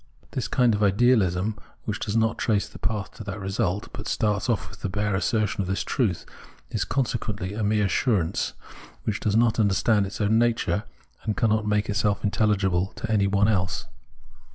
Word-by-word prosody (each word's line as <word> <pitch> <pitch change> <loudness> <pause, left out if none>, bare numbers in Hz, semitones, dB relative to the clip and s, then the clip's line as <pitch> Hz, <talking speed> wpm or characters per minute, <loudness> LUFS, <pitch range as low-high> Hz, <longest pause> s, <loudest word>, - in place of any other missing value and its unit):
The - - -2
kind 125 -3 +3
of 105 - -1
Ideahsm 105 -2 +3 0.3
which - - -2
does 105 +2 -1
not 110 0 +1
trace 105 -3 +1
the - - -12
path 100 +1 -2
to - - -7
that 100 +1 -5
result, 95 0 -1
but - - -6
starts 105 +1 0
off 115 - 0
with - - -14
the 100 - -2
bare 105 +2 -1
assertion 105 0 0
of 95 - -3
this 95 +1 -1
truth, 105 -10 -1 0.5
is - - 0
consequently 110 -7 -2
a 110 +1 -2
mere 105 0 +2
assurance, 95 -3 +1 0.5
which 110 -1 -1
does 105 -1 0
not 115 0 +3
understand 100 0 +3
its 100 - -8
own 110 +1 +3
nature, 115 -5 +1 0.4
and 110 - -2
cannot 110 -1 +2
make 105 0 +1
itself 100 0 0
intelHgible 100 -2 +1
to 115 - -4
any 100 -3 +3
one 100 +1 +3
else. 90 -4 0
105 Hz, 180 wpm, -25 LUFS, 100-110 Hz, 0.5 s, kind